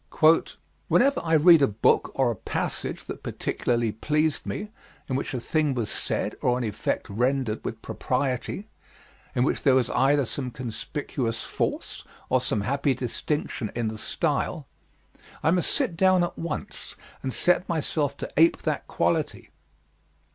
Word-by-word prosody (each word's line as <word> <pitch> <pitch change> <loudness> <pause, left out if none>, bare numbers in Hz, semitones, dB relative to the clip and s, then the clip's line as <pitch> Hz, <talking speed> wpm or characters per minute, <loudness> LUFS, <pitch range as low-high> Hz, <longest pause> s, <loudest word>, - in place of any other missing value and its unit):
Whenever 275 +3 +3
I 165 -1 0
read 165 +1 +7
a 140 - +6
book 105 +1 +2
or 130 -3 +3
a - - -3
passage - - -3
that - - -7
particularly 120 -2 -1
pleased 150 +7 0
me, 210 0 -4 0.4
in 130 - -1
which 135 0 -2
a - - -1
thing 150 +2 0
was 115 -4 -1
said - - -1
or 125 0 +2
an 125 - -2
effect 105 -2 -2
rendered 125 +1 0
with 115 - -5
propriety, 130 - -2 0.7
in 125 - +3
which 140 - 0
there 135 -3 +4
was 130 -3 +2
either 140 +1 +3
some 130 +2 -3
conspicuous 120 -1 -4
force - - -3 0.3
or - - +3
some 105 - 0
happy 140 +4 +1
distinction 125 -1 -2
in 115 -2 0
the 110 - -6
style, - - -1 0.8
I 160 - +4
must 180 -1 +2
sit 170 - +1
down 185 -1 +4
at 175 - -2
once 165 -2 -5 0.3
and 130 - -2
set 180 +6 +2
myself 150 -3 -1
to - - -6
ape 165 +2 +4
that - - -2
quality. - - -1
135 Hz, 155 wpm, -26 LUFS, 120-155 Hz, 0.8 s, read